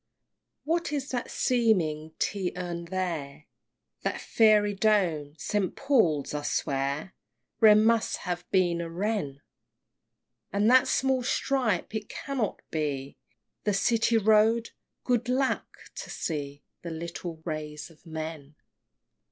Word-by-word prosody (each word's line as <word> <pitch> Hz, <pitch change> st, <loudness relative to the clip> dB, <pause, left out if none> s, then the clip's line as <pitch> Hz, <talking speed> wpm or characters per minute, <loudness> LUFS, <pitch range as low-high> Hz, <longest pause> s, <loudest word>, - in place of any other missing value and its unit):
VI. -, -, -56 dB
What 335 Hz, +1 st, 0 dB
is 280 Hz, -2 st, -2 dB
that 245 Hz, -2 st, -3 dB
seeming 165 Hz, -11 st, +1 dB
tea 190 Hz, -3 st, -1 dB
urn 175 Hz, -1 st, -4 dB
there? 165 Hz, -5 st, -4 dB, 0.6 s
That -, -, -2 dB
fairy 210 Hz, -2 st, +4 dB
dome, 180 Hz, -8 st, +1 dB
St. 200 Hz, +5 st, -1 dB
Paul's! 200 Hz, -, +2 dB
I 150 Hz, -, -2 dB
swear, 140 Hz, +4 st, -2 dB, 0.5 s
Wren 215 Hz, -1 st, +7 dB
must 230 Hz, 0 st, +2 dB
have 175 Hz, -1 st, -4 dB
been 175 Hz, -3 st, +2 dB
a 170 Hz, -, -5 dB
Wren! 170 Hz, -6 st, -2 dB, 1.1 s
And 205 Hz, +1 st, +2 dB
that 260 Hz, +1 st, +6 dB
small 265 Hz, 0 st, +2 dB
stripe? 245 Hz, -6 st, 0 dB
it 215 Hz, -2 st, -4 dB
cannot 265 Hz, -8 st, -3 dB
be 140 Hz, -3 st, -2 dB, 0.5 s
The 205 Hz, -2 st, +1 dB
City 230 Hz, +3 st, +3 dB
Road! 220 Hz, +2 st, +3 dB, 0.3 s
Good 245 Hz, -1 st, 0 dB
lack! 265 Hz, +1 st, +1 dB, 0.3 s
to -, -, -6 dB
see 145 Hz, -3 st, -4 dB, 0.2 s
The 170 Hz, -, -6 dB
little 170 Hz, +1 st, -5 dB
ways 155 Hz, -1 st, -5 dB
of 155 Hz, -, -22 dB
men! 155 Hz, -3 st, -7 dB
185 Hz, 125 wpm, -28 LUFS, 155-225 Hz, 1.1 s, Wren